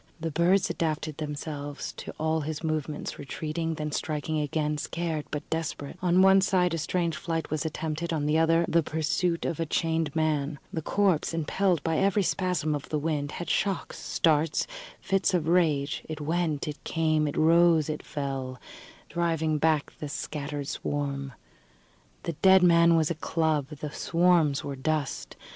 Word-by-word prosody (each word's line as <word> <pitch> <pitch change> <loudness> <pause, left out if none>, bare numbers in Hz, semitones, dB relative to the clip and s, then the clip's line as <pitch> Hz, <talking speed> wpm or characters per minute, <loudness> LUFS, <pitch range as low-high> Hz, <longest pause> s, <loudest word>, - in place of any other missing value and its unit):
The 165 0 -3
birds 175 +5 +3
adapted 155 -2 -2
themselves 145 -1 -5
to - - -6
all 160 0 +1
his 155 +2 -4
movements, 155 -2 -3
retreating, 160 +3 -3
then 150 0 -3
striking 155 +1 -2
again, 150 0 -1
scared 165 -1 -3
but 150 - -5
desperate. 160 -3 -3
On 180 +1 +4
one 195 0 +7
side 180 -3 +2
a 165 - -1
strange 170 +1 -1
flight 165 -3 -3
was 155 +1 -1
attempted, 160 +1 -3
on 155 -3 -1
the 150 +1 +2
other 165 +1 +4
the 170 - +3
pursuit 160 +3 -1
of 170 - -2
a 165 - 0
chained 160 -1 0
man. 155 -2 0 0.2
The 160 - -2
corpse, 185 -2 +1
impelled 170 +1 +1
by 160 -1 +1
every 200 +1 +3
spasm 180 -5 0
of 145 0 -4
the 155 - 0
wind, 150 -1 -2
had 175 - -5
shocks, 195 -2 -1
starts, 155 -1 +1 0.3
fits 195 -1 +1
of 165 -3 0
rage: 155 -5 +2
it 155 -1 -4
went, 155 -1 -1
it 150 0 -6
came, 155 -2 +1
it 145 - -4
rose, 165 -1 +5
it 155 -1 -3
fell, 135 -3 -4 0.5
driving 160 -3 0
back 155 -1 +1
the 150 - -5
scattered 145 -1 -4
swarm. 140 -2 -3 0.9
The 170 - -2
dead 190 -1 +7
man 170 -1 +6
was 160 0 +2
a - - +2
club, 160 -3 0
the 150 0 -7
swarms 165 -4 +2
were 140 - -4
dust. 150 +1 -2
160 Hz, 165 wpm, -28 LUFS, 150-170 Hz, 0.9 s, one